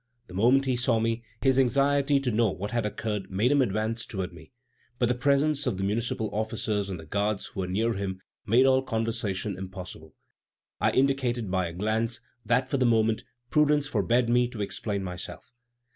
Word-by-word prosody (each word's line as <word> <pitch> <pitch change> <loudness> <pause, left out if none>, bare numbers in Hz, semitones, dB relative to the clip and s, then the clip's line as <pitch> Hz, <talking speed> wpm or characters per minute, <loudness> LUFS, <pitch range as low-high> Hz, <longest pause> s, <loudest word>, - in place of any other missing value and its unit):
The - - -13
moment 125 +8 +4
he 130 -1 +1
saw 120 -2 +2
me, 115 +1 0 0.2
his 135 -1 +4
anxiety 140 +2 +3
to 130 -3 0
know 115 0 +3
what 100 +2 -5
had 120 -3 0
occurred 105 -2 -4
made 105 +7 +1
him 145 -1 +4
advance 110 0 0
toward 95 -4 -5
me; 80 -2 -14 0.5
but 120 - +2
the 125 - +2
presence 140 +3 +2
of 105 - 0
the 95 - -2
municipal 110 +2 -1
officers 105 -1 -1
and 90 -3 -4
the 80 - -10
guards 100 +5 -1
who - - -8
were 95 - -1
near 110 +6 0
him 95 -2 -4 0.2
made 120 +5 +4
all 130 0 +4
conversation 110 -5 -2
impossible. 90 -5 -9 0.6
I - - +3
indicated 130 -6 +1
by 95 -2 +1
a 85 - -7
glance 110 +5 -1 0.2
that, 125 +3 +2
for 140 - 0
the 130 - +2
moment, 110 -1 +2 0.3
prudence 150 -1 +3
forbade 120 0 +1
me 120 +1 +3
to 120 -3 -7
explain 100 0 -3
myself. 90 +5 -7
115 Hz, 190 wpm, -27 LUFS, 100-125 Hz, 0.6 s, moment